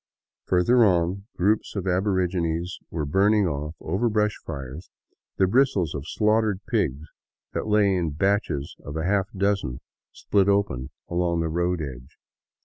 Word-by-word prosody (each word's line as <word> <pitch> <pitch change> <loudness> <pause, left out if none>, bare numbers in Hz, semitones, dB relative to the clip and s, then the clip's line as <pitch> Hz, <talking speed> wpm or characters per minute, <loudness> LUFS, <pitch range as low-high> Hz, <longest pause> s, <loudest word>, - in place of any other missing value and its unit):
Further 115 +7 +4
on, 95 0 +1
groups 105 +5 +1
of 100 -2 -3
aborigines 90 -3 0
were 80 -2 -3
burning 100 +7 +3
off, 75 -1 -3
over 100 +9 0
brush 105 -1 +1
fires, 70 +2 -7 0.5
the 95 - +4
bristles 100 - +2
of 75 +1 -6
slaughtered 105 -1 +1
pigs 80 - -1 0.5
that - - -3
lay 105 -2 +3
in 85 -3 0
batches 80 -3 -1
of 70 +2 -6
a 80 - -2
half 95 0 +1
dozen, 100 -10 0 0.3
spHt 100 -2 +1
open, 100 -11 +1 0.2
at - - -8
the 85 -2 +1
road 85 +1 0
edge. 65 -3 -9
90 Hz, 140 wpm, -25 LUFS, 80-100 Hz, 0.5 s, Further